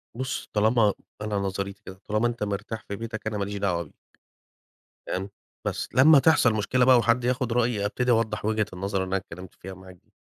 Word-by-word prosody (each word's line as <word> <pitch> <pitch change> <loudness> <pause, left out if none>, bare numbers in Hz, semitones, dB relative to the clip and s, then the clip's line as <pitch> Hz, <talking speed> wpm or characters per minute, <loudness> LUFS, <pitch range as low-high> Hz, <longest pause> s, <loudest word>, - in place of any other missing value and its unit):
بُصّ، 130 +1 -4
طالما 110 0 +3 0.3
أنا 105 -1 -2
نظريتي 100 0 -3
كده، 95 0 -10
طالما 105 +3 +1
أنت 120 -2 -3
مرتاح 105 +2 -4
في 100 - -4
بيتك 110 0 -6
أنا 110 -1 -2
ما 100 - -1
ليش 100 +1 -5
دعوة 90 -4 0
بيك، 75 - -18 1.1
فاهم، 95 +2 -3 0.4
بس - - -2
لمّا 140 +4 +7
تحصل 135 -6 +4
مشكلة 125 +4 +2
بقى 130 -1 +7
وحد 120 +1 +2
ياخد 125 -1 0
رأيي 115 -3 +1
ابتدي 125 +4 -1
أوضّح 110 -2 +1
وجهة 110 -1 +1
النظر 95 +1 -2
اللي - - -7
أنا 95 - 0
اتكلّمت 90 -1 -8
فيها 95 +1 -9
معاك 95 0 -13
دي، - - -37
105 Hz, 200 wpm, -26 LUFS, 100-120 Hz, 1.1 s, لمّا